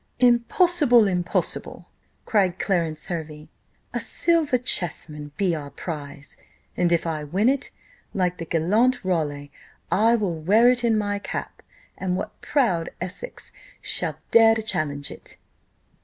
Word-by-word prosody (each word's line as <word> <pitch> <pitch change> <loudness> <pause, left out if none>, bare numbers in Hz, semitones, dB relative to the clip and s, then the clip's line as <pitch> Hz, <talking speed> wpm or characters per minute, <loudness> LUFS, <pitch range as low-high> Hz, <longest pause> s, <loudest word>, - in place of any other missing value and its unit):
"Impossible! 245 - +4
impossible!" 180 -2 -2 0.4
cried 190 -5 +1
Clarence 165 -6 -1
Hervey: 155 -3 -6 0.4
"a - - -1
silver 325 -6 +3
chess 180 -11 0
man 150 -1 -9
be 190 -3 +1
our 145 -3 -5
prize; 145 -3 -8 0.4
and 175 -1 +1
if 170 -1 +2
I 155 -2 -2
win 185 +10 0
it, 275 0 -1 0.4
like 180 -2 -1
the 165 - -4
gallant 210 +10 +1
Raleigh, 145 -5 -2 0.4
I 225 +4 +4
will 205 -6 -1
wear 205 +10 +4
it 245 -1 -2
in 230 -2 +3
my 205 -1 -1
cap; - - -6 0.3
and 185 -1 -2
what - - -6
proud 200 - +1
Essex 185 - -7 0.3
shall - - -1
dare 225 -1 +7
to 220 - -3
challenge 145 -9 -3
it?" - - -10
185 Hz, 140 wpm, -24 LUFS, 160-230 Hz, 0.4 s, dare